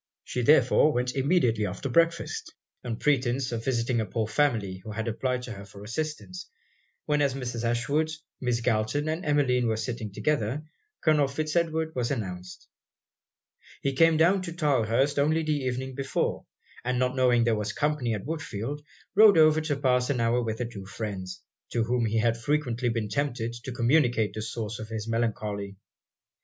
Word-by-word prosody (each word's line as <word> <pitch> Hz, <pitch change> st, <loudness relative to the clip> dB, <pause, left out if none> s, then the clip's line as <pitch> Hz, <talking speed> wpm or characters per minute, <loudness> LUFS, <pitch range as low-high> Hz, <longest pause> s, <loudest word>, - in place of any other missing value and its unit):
She 125 Hz, -, -3 dB
therefore 135 Hz, +3 st, +5 dB
went 125 Hz, -1 st, -1 dB
immediately 130 Hz, -, +2 dB
after 95 Hz, +9 st, -4 dB
breakfast, 170 Hz, -, 0 dB, 0.3 s
on 120 Hz, -2 st, -3 dB
pretence 130 Hz, -2 st, +1 dB
of 115 Hz, -1 st, -3 dB
visiting 120 Hz, -2 st, 0 dB
a -, -, -1 dB
poor 110 Hz, +2 st, -1 dB
family 110 Hz, -8 st, +1 dB
who 110 Hz, -, -8 dB
had 110 Hz, +2 st, -3 dB
applied 125 Hz, +2 st, -1 dB
to 125 Hz, -, -6 dB
her 100 Hz, -2 st, -8 dB
for 100 Hz, 0 st, -12 dB
assistance; 155 Hz, -, -5 dB, 0.6 s
when 150 Hz, -1 st, +1 dB
as 140 Hz, -2 st, +1 dB
Mrs. 120 Hz, -3 st, -4 dB
Ashwood, 120 Hz, +7 st, +1 dB, 0.3 s
Miss 125 Hz, -2 st, 0 dB
Galton 110 Hz, +7 st, 0 dB
and 160 Hz, +3 st, -2 dB
Emmeline, 130 Hz, -5 st, +2 dB
were 110 Hz, -1 st, 0 dB
sitting 110 Hz, -1 st, -4 dB
together, 140 Hz, +3 st, -1 dB, 0.4 s
Colonel 150 Hz, -3 st, +3 dB
Fitz 155 Hz, +3 st, -3 dB
Edward 160 Hz, -1 st, 0 dB
was 120 Hz, -2 st, -1 dB
announced. 90 Hz, -8 st, -5 dB, 1.2 s
He 140 Hz, -, +1 dB
came 165 Hz, +3 st, +5 dB
down 180 Hz, +4 st, +4 dB
to 170 Hz, -3 st, -5 dB
Tylehurst 140 Hz, -3 st, +1 dB
only 155 Hz, +3 st, +2 dB
the 155 Hz, -1 st, 0 dB
evening 130 Hz, -1 st, -3 dB
before; 135 Hz, +1 st, -2 dB, 0.4 s
and 125 Hz, +1 st, 0 dB
not 125 Hz, +1 st, +1 dB
knowing 125 Hz, -2 st, +4 dB
there 115 Hz, -1 st, +2 dB
was 105 Hz, -1 st, -1 dB
company 145 Hz, -4 st, 0 dB
at 105 Hz, -, -6 dB
Woodfield, 145 Hz, -3 st, -4 dB, 0.3 s
rode 210 Hz, -3 st, +7 dB
over 155 Hz, 0 st, +6 dB
to 155 Hz, -2 st, -1 dB
pass 125 Hz, -2 st, +2 dB
an 135 Hz, -4 st, 0 dB
hour 115 Hz, +1 st, +2 dB
with 110 Hz, -2 st, -3 dB
the 125 Hz, -, -2 dB
two 100 Hz, -5 st, -8 dB
friends, 95 Hz, -3 st, -6 dB, 0.3 s
to 115 Hz, -, +2 dB
whom 120 Hz, 0 st, +1 dB
he 110 Hz, +1 st, 0 dB
had 115 Hz, +1 st, +2 dB
frequently 125 Hz, -4 st, 0 dB
been 115 Hz, -2 st, -1 dB
tempted 120 Hz, 0 st, -2 dB
to 130 Hz, -, -4 dB
communicate 120 Hz, -4 st, +2 dB
the 110 Hz, -, -4 dB
source 110 Hz, -1 st, -4 dB
of 110 Hz, 0 st, -7 dB
his 110 Hz, -1 st, -4 dB
melancholy. 105 Hz, -3 st, -2 dB
125 Hz, 175 wpm, -27 LUFS, 115-145 Hz, 1.2 s, rode